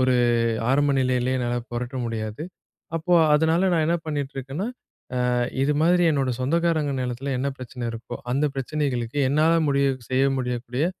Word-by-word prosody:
ஒரு 130 0 +3 0.6
ஆரம்ப 145 +1 +3
நிலையிலேயே 130 0 +1
என்னால 120 -1 -1
புரட்ட 120 +2 -4
முடியாது. 110 +3 -4 0.5
அப்போ, 175 +2 -1 0.2
அதனால, 160 +3 +3
நான் 160 -2 +2
என்ன 170 +1 +2
பண்ணிகிட்டு 145 -2 -3
இருக்கேன்னா, 135 - -4 0.6
ஆ - - +1 0.3
இது 150 +2 +2
மாதிரி, 175 +1 +4
என்னோட 135 -3 0
சொந்தக்காரங்க 160 0 +1
நிலத்தில 125 +2 -3
என்ன 140 +1 0
பிரச்சனை 125 -1 -7
இருக்கோ, 115 +1 -7 0.2
அந்த 145 +3 +2
பிரச்சனைகளுக்கு, 135 -2 -2
என்னால 155 +3 +3 0.2
முடிய 140 0 +2 0.2
செய்ய 130 +1 +3
முடியக்கூடிய, 125 +3 -2
135 Hz, 145 wpm, -24 LUFS, 125-155 Hz, 0.6 s, மாதிரி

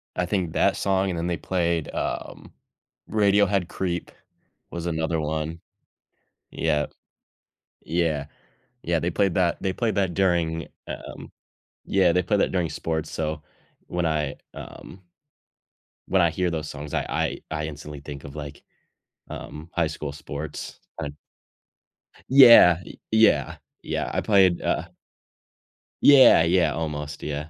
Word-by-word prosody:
I 90 - 0
think 90 -3 -2
that 100 +2 +2
song, 95 0 +1
and 90 - -3
then 85 - -2
they 85 -1 -1
played, 85 -1 -1
um - - -5 0.6
Radiohead 100 -3 +2
Creep 90 -2 -3 0.6
was 85 -1 -5
another 80 -1 -1
one. 80 +2 -3 0.9
Yup. 75 -2 0 0.9
Yeah. 80 -3 -1 0.6
Yeah, 85 -1 +1
they 85 - -1
played 95 0 +1
that 85 -2 +1
they 95 - 0
played 110 -2 -1
that 95 -3 0
during, 85 -3 0 0.2
um - - -8 0.5
Yeah, 95 -3 +3
they 90 +1 +1
played 100 +3 +1
that - - +1
during 90 -3 0
sports, 80 -2 -3
so 80 -1 -3 0.5
when 90 -1 -2
I 75 -3 -1 0.2
um 95 - -11 1.1
when 95 -1 +3
I 85 - +4
hear 90 +2 -1
those 80 -2 -4
songs, 75 0 -8
I - - 0
I - - -1
I 75 -1 -2
instantly 75 -1 -8
think 70 -1 -9
of 70 0 -10
like, 75 -1 -8 0.7
um, 75 +2 -8
high 85 -2 +1
school 75 -1 -5
sports 75 +1 -7 0.2
and 70 -1 -5 1.2
Yeah, 115 -10 +8
y - - -12
yeah, 110 -11 +3 0.3
yeah, - - -2
I - - 0
played 95 -4 +4
uh - - -1 1.2
Yeah, 135 -11 +8
yeah, 85 +2 +2
almost, 75 -2 -5
yeah. 75 +1 -4
85 Hz, 140 wpm, -24 LUFS, 75-95 Hz, 1.2 s, Yeah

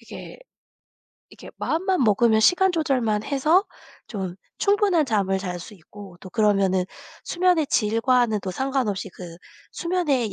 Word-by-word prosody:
이게 - - -11 0.9
이렇게 - - -13
마음만 370 0 0
먹으면 220 +1 +3
시간 360 +10 +4
조절만 255 -10 0
해서 305 - +2 0.4
좀 190 -5 -5 0.2
충분한 400 -5 +2
잠을 200 -6 0
잘 180 -2 -5
수 205 - -11
있고 195 +1 -13
또 185 - -10
그러면은 195 -4 +2 0.4
수면의 350 -3 +1
질과는 230 0 +1
또 190 - -5
상관없이 250 -5 -2
그 170 -2 -10 0.4
수면의 300 - -1
230 Hz, 280 characters per minute, -23 LUFS, 200-315 Hz, 0.9 s, 시간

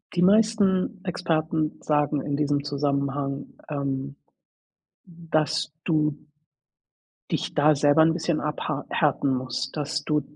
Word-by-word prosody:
die 175 - +2
meisten 200 -1 +3
Experten 160 -4 -1
sagen 150 -1 +1
in 145 0 -2
diesem 145 -1 0
Zusammenhang, 140 -1 -2 0.2
ähm, 140 -1 -3 0.9
dass 165 -4 -1
du 150 -3 +1 1.2
dich - - -2
da 150 +1 +5
selber 145 +2 +4
'n 160 +1 +4
bisschen 165 -1 -1
abhar 150 -1 -3
härten 140 -3 +1
musst, 130 +4 -3
dass 145 0 -2
du 150 -1 +1
150 Hz, 115 wpm, -25 LUFS, 140-165 Hz, 1.2 s, da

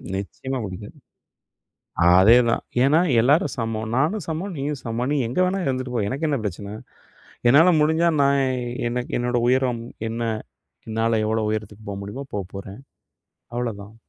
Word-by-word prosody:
நிச்சயமா 130 +7 -4
பிடிக்காது. 95 +2 -9 1.2
அதேதான், 115 +5 +5 0.2
ஏன்னா, 150 +4 +4 0.2
எல்லாரும் 145 +10 +3
சமம். 110 -2 -3
நானும் 160 +8 +1
சமம், 175 +4 -3
நீயும் 140 0 -3
சமம். 120 +2 -2
நீ - - +1
எங்கே 130 +10 +1
வேணா 190 +2 0
இருந்துட்டு 130 -1 -2
போ. 120 - +1
எனக்கு 140 +8 -2
என்ன 145 -2 0
பிரச்சன? 100 +2 -5 0.7
என்னால 160 +8 +6
முடிஞ்சா, 160 +3 +3
நான் 140 0 +3 0.5
எனக்கு 125 +1 -4
என்னோட 120 0 0
உயரம் 125 -2 +1 0.3
என்ன? 115 +1 -4 0.7
என்னால 115 0 +1
எவ்ளோ 110 0 0
உயரத்துக்கு 110 0 -5
போக 100 - -4
முடியுமோ 105 +8 -6
போகப்போறேன் 100 +2 -6 0.8
அவ்ளதான். 110 -4 -4
120 Hz, 135 wpm, -23 LUFS, 110-140 Hz, 1.2 s, என்னால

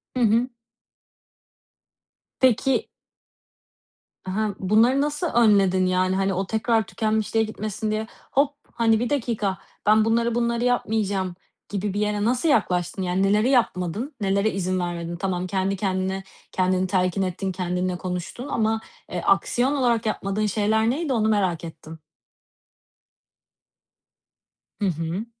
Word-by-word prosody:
Hı 255 - -1
hı. 230 +3 +3 1.9
Peki 260 +1 +2 1.4
Ha, 200 +2 -2
bunları 225 +8 +3
nasıl 300 +4 -1
önledin 200 - +4
yani, 185 +1 +1
hani, 195 0 +1
o 190 +1 -2
tekrar 225 0 +1
tükenmişliğe 220 0 0
gitmesin 215 0 -4
diye 215 +1 -2 0.2
"Hop!" 285 +1 +2 0.2
hani, 225 -1 +3
"Bir 240 0 -1
dakika, 225 -8 -1 0.3
ben 215 +1 +5
bunları 230 +1 +1
bunları 235 0 0
yapmayacağım." 205 -6 0 0.3
gibi 200 -1 -2
bir 205 - -2
yere 210 0 0
nasıl 250 +7 +1
yaklaştın, 180 - +1
yani 185 +1 0
neleri 210 +5 +3
yapmadın, 225 - 0
nelere 200 +2 +2
izin 185 -1 -1
vermedin? 175 -1 -3
Tamam, 185 0 -2
kendi 195 +1 0
kendine, 190 0 -2 0.3
kendini 185 0 +1
telkin 185 0 +1
ettin, 190 +1 -2
kendinle 180 0 -2
konuştun 180 +9 -5
ama, 220 -3 0 0.3
eee, - - -2
aksiyon 260 +4 +2
olarak 240 -5 +1
yapmadığın 215 -1 -1
şeyler 215 +2 +1
neydi, 285 +2 -1
onu 220 -3 +2
merak 190 -6 +1
ettim. 160 -1 -9 2.8
Hı - - +2
hı. 170 +5 -2
205 Hz, 125 wpm, -24 LUFS, 185-230 Hz, 2.8 s, ben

